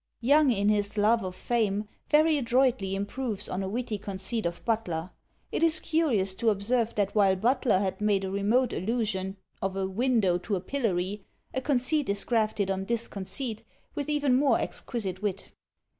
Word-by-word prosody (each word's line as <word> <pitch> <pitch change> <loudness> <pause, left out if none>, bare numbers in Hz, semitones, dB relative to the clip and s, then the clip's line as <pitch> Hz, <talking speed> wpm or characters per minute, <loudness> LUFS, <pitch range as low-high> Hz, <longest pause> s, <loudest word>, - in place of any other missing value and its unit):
Young, 285 +3 +4
in 200 -3 +1
his 205 0 0
"Love 220 +3 +3
of 185 -1 -5
Fame," 215 -3 -1 0.2
very 310 +1 +4
adroitly 245 -6 +1
improves 205 +2 -2
on 185 - -3
a 190 - -3
witty 225 -1 -3
conceit 200 +1 -2
of 170 0 -7
Butler. 185 -7 -2 0.4
It - - -2
is 330 -1 +6
curious 270 - +1
to 230 - +4
observe 225 +3 +1
that 200 -1 0
while 195 -3 +4
Butler 235 +1 +2
had 190 +1 -2
made 205 -2 +1
a 190 - -4
remote 220 +6 +1
allusion 195 -2 -2 0.2
of 195 0 -2
a 195 0 -1
window 200 -3 +1
to 200 +3 -2
a - - -1
pillory, 200 -4 -2 0.3
a 260 - -1
conceit 280 +1 +1
is 200 0 +1
grafted 215 -4 0
on 190 0 -2
this 230 +2 0
conceit, 220 +3 -5 0.3
with 290 0 -4
even 290 -3 +2
more 265 -2 +3
exquisite 195 -6 -3
wit. 200 -2 -3
215 Hz, 175 wpm, -28 LUFS, 195-250 Hz, 0.4 s, is